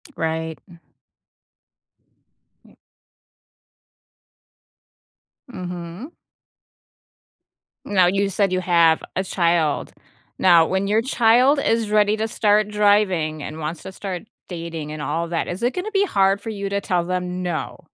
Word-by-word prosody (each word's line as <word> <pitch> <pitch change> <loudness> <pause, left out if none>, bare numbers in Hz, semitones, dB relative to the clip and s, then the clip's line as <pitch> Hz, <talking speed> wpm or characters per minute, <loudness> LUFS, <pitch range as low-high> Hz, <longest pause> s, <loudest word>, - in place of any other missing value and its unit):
Right. 160 0 -3 2.0
Yeah. - - -22 2.8
Mhm. 180 - -7 1.7
Now, 185 -3 +3
you 195 +2 +1
said 195 0 +1
you 185 0 0
have 170 -3 +3
a 190 - 0
child. 170 -5 0 0.5
Now, 170 -3 +6
when 190 +3 -1
your 215 +2 +2
child 255 +3 +4
is 225 -4 0
ready 210 0 +3
to 220 - -1
start 210 -1 +2
driving 205 -7 +1
and 155 +2 -7
wants 155 +2 -5
to 190 - -8
start 190 -2 -6 0.3
dating 165 -3 -6
and 155 - -6
all 165 +3 -2
that, 165 0 -2
is 175 +5 -5
it 245 +2 +1
gonna 375 +4 -4
be 395 -1 +2
hard 195 - +2
for 225 - -6
you 200 -2 -4
to 200 0 -1
tell 180 -2 0
them 180 0 -3
"no?" 165 -5 -4
185 Hz, 125 wpm, -22 LUFS, 170-210 Hz, 2.8 s, Now